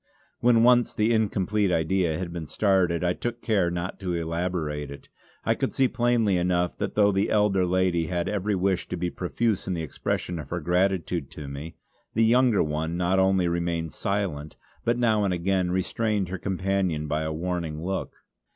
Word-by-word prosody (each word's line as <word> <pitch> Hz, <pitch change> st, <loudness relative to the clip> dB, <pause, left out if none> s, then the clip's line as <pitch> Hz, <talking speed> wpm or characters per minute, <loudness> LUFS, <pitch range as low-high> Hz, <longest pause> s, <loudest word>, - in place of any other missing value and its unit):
When 115 Hz, -1 st, +4 dB
once 120 Hz, 0 st, +4 dB
the 110 Hz, +2 st, +2 dB
incomplete 105 Hz, -2 st, +1 dB
idea 85 Hz, 0 st, +1 dB
had 85 Hz, -1 st, -5 dB
been 85 Hz, -3 st, -5 dB
started 90 Hz, -4 st, +1 dB
I 90 Hz, 0 st, +2 dB
took 120 Hz, +3 st, -4 dB
care 100 Hz, -6 st, +2 dB
not 85 Hz, +1 st, -4 dB
to 90 Hz, -3 st, -2 dB
elaborate 85 Hz, -3 st, -2 dB
it. 70 Hz, 0 st, -11 dB, 0.4 s
I -, -, +3 dB
could -, -, -2 dB
see 135 Hz, -, +4 dB
plainly 120 Hz, -5 st, +2 dB
enough 90 Hz, 0 st, +1 dB
that -, -, -3 dB
though 105 Hz, -1 st, +5 dB
the 95 Hz, +1 st, +1 dB
elder 100 Hz, -3 st, +2 dB
lady 90 Hz, -2 st, +1 dB
had 85 Hz, -1 st, -1 dB
every 105 Hz, 0 st, -1 dB
wish 95 Hz, 0 st, 0 dB
to 90 Hz, -, -4 dB
be 85 Hz, 0 st, -2 dB
profuse 100 Hz, +3 st, -1 dB
in 95 Hz, -, -1 dB
the 80 Hz, -, -3 dB
expression 85 Hz, +3 st, -3 dB
of 70 Hz, -3 st, -8 dB
her 85 Hz, -, -2 dB
gratitude 90 Hz, -2 st, 0 dB
to 75 Hz, -2 st, -8 dB
me, 70 Hz, +5 st, -7 dB, 0.4 s
the 115 Hz, +1 st, +4 dB
younger 120 Hz, -1 st, +4 dB
one 80 Hz, +2 st, -2 dB
not 90 Hz, +2 st, +2 dB
only 95 Hz, -1 st, +3 dB
remained 85 Hz, -2 st, -1 dB
silent 95 Hz, -8 st, -3 dB, 0.3 s
but 120 Hz, +1 st, +1 dB
now 110 Hz, -3 st, +2 dB
and 95 Hz, -2 st, +1 dB
again 90 Hz, +1 st, 0 dB
restrained 100 Hz, +2 st, -1 dB
her 95 Hz, 0 st, -4 dB
companion 95 Hz, -5 st, -1 dB
by 75 Hz, +1 st, -1 dB
a 80 Hz, 0 st, -2 dB
warning 85 Hz, -1 st, -3 dB
look. 95 Hz, +1 st, -3 dB
90 Hz, 185 wpm, -26 LUFS, 85-100 Hz, 0.4 s, though